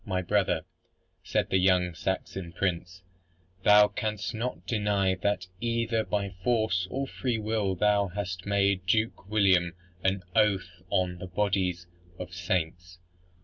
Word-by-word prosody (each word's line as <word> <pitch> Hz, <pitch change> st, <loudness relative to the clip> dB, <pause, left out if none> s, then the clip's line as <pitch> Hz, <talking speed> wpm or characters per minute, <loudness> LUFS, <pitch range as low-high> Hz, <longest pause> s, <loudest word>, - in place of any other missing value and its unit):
"My 95 Hz, -2 st, -2 dB
brother", 100 Hz, +1 st, +1 dB, 0.6 s
said -, -, -1 dB
the 95 Hz, -, +4 dB
young 90 Hz, -1 st, +3 dB
Saxon 95 Hz, 0 st, -4 dB
prince, 90 Hz, 0 st, -2 dB, 0.6 s
"thou 105 Hz, +1 st, +7 dB
canst 105 Hz, +1 st, -3 dB
not 120 Hz, +3 st, -4 dB
deny 105 Hz, -4 st, +1 dB
that 95 Hz, 0 st, -1 dB
either 115 Hz, -1 st, 0 dB
by 100 Hz, -2 st, -2 dB
force 110 Hz, -7 st, +1 dB
or 135 Hz, +5 st, -2 dB
free 125 Hz, -3 st, -2 dB
will 105 Hz, -3 st, -1 dB
thou 100 Hz, +1 st, +3 dB
hast 95 Hz, 0 st, -5 dB
made 100 Hz, -2 st, +1 dB
Duke 110 Hz, -1 st, 0 dB
William 95 Hz, -5 st, +3 dB, 0.3 s
an 95 Hz, 0 st, +1 dB
oath 95 Hz, -4 st, +1 dB
on 90 Hz, -1 st, 0 dB
the 95 Hz, -, -6 dB
bodies 90 Hz, -2 st, 0 dB, 0.3 s
of 90 Hz, -1 st, -7 dB
saints. 85 Hz, 0 st, -2 dB
95 Hz, 135 wpm, -28 LUFS, 90-105 Hz, 0.6 s, thou